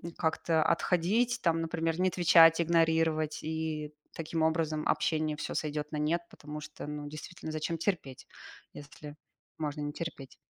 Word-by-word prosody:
как-то 160 0 +1
отходить. 190 +10 +2
Там, 165 -1 +2
например, 165 +1 -1
не 185 - +3
отвечать, 165 -2 +6
игнорировать 160 -2 +2
и, 155 -1 -3 0.2
таким 165 0 -2
образом, 160 -1 +1
общение 155 -1 +1
всё - - -4
сойдёт 150 -1 -2
на 155 - -3
нет, 160 +3 +1
потому 150 +1 -8
что, 150 - -8
ну 150 0 -5
действительно, 155 +2 -7
зачем 155 +2 -2
терпеть, 165 -8 -3 0.5
если 145 0 -10 0.4
можно 150 -1 -3
не 145 - -2
терпеть. 145 -4 -7
160 Hz, 145 wpm, -31 LUFS, 150-165 Hz, 0.5 s, отвечать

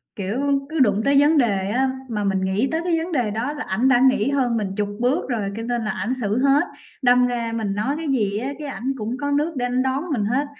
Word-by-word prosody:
Kiểu, 205 +6 -3 0.3
cứ 320 0 -3
đụng 210 -5 +3
tới 280 0 +5
vấn 295 +2 +4
đề 200 -7 +1
á, 260 +5 +1 0.2
mà 210 -3 -2
mình 195 -1 0
nghĩ 190 +6 0
tới 320 +1 0
cái 345 -2 +1
vấn 330 +2 -3
đề 245 -9 0
đó 230 +7 -2
là 295 - -5
ảnh 230 +7 +1
đã 245 -2 +5
nghĩ 260 -2 +3
hơn 250 -4 +1
mình 195 -3 -3
chục 205 -1 0
bước 255 +7 0
rồi 215 -5 -1
cho 225 - -4
nên 240 0 -1
là 215 - -1
ảnh 205 +7 -2
xử 225 -3 -1
hết. 275 +1 +4 0.4
Đâm 250 -1 +4
ra 235 -2 -2
mình 220 -3 -2
nói 250 +8 -1
cái 320 0 -4
gì 210 -7 0
á 265 +5 -3
cái 300 - -5
ảnh 260 0 -3
cũng 230 +2 -3
có 285 0 -1
nước 300 +3 +1
để 245 - 0
ảnh 250 +1 0
đón 265 +2 -1
mình 225 -8 0
hết, 255 +7 0
245 Hz, 265 wpm, -22 LUFS, 210-275 Hz, 0.4 s, tới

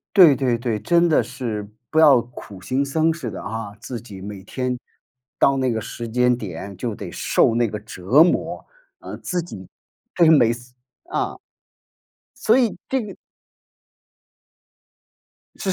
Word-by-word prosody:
对 170 -9 +8
对 125 -3 +1
对， 115 -3 -2
真 170 +10 +3
的 155 - +4
是， 115 -4 -5 0.2
不 160 - +3
要 145 -5 +7
苦 110 -5 -12
行 130 +8 0
僧 160 +3 +1
似 155 -8 -5
的 - - -7
啊， 105 -1 -5
自 120 0 -6
己 100 -5 -11
每 100 -1 -8
天 125 +2 -3 0.6
到 135 0 +3
那 130 -2 +1
个 110 - -1
时 115 +1 -6
间 125 +1 +3
点 100 -3 -7
就 110 +3 -4
得 95 -4 -7
受 - - +2
那 120 0 +2
个 105 0 -5
折 110 - +3
磨 175 - -1 0.3
呃， - - -8
自 180 -1 -2
己 95 - -10 0.5
对， 170 -2 +5
每 130 -8 +6
次 120 +1 -9 0.4
啊。 - - -2 1.0
所 225 +4 +4
以， 235 -7 +1
这 265 -1 0
个 210 -3 -7 2.4
是。 195 - -4
125 Hz, 165 characters per minute, -22 LUFS, 105-155 Hz, 2.4 s, 对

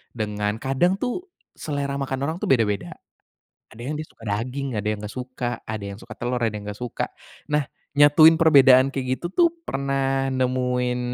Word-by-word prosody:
dengan 105 -1 -2
kadang 135 +10 +1
tuh 255 - -3 0.2
selera 140 -2 -3
makan 135 -1 -2
orang 160 +3 -1
tuh - - -3
beda-beda, 110 -6 +1 0.7
ada 115 - -13
yang 140 +5 -3
dia 155 - -5
suka 115 - -19
daging, 125 +6 -3
ada 105 +1 -2
yang 110 - -1
gak 105 - -7
suka, 125 -2 -4
ada 110 -2 -4
yang 100 0 -6
suka - - -10
telur, 120 0 -2
ada 115 - +2
yang 105 -1 -6
gak 105 0 -6
suka. 125 -2 -3 0.4
Nah 150 0 +2 0.3
nyatuin 145 +3 +7
perbedaan 135 -5 +6
kayak 130 -1 -1
gitu 175 - -2
tuh 345 - +5 0.2
pernah 135 - -1
nemuin 125 -1 0
130 Hz, 180 wpm, -23 LUFS, 115-140 Hz, 0.7 s, nyatuin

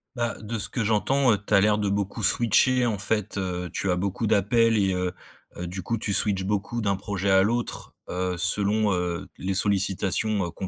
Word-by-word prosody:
Bah, 120 -1 -2
de 110 +1 -5
ce - - +1
que 120 - -2
j'entends, 120 +5 +2
heu, 105 - -1
tu 105 - -4
as - - +6
l'air 105 +1 +2
de 105 -1 0
beaucoup 100 0 -2
switcher, 125 +2 +3
en 110 -4 -1
fait, 105 -1 -2
heu, 90 -1 -3
tu 95 - -2
as 90 - +2
beaucoup 100 +4 -2
d'appels 110 +2 +3
et 95 -2 +1
heu 90 0 -1 0.5
heu, 90 - -5
du 95 +2 -5
coup 115 +6 -2
tu 100 - -1
switches 95 -1 +3
beaucoup 105 +4 -2
d'un 100 -2 0
projet 100 -1 -2
à 95 - +5
l'autre, 120 +3 -3 0.2
heu, 90 0 -2
selon, 105 +3 +1
heu, 90 0 -3
les 95 +1 -2
sollicitations 100 -1 +1
qu'on 95 +3 -6
100 Hz, 210 wpm, -25 LUFS, 95-110 Hz, 0.5 s, as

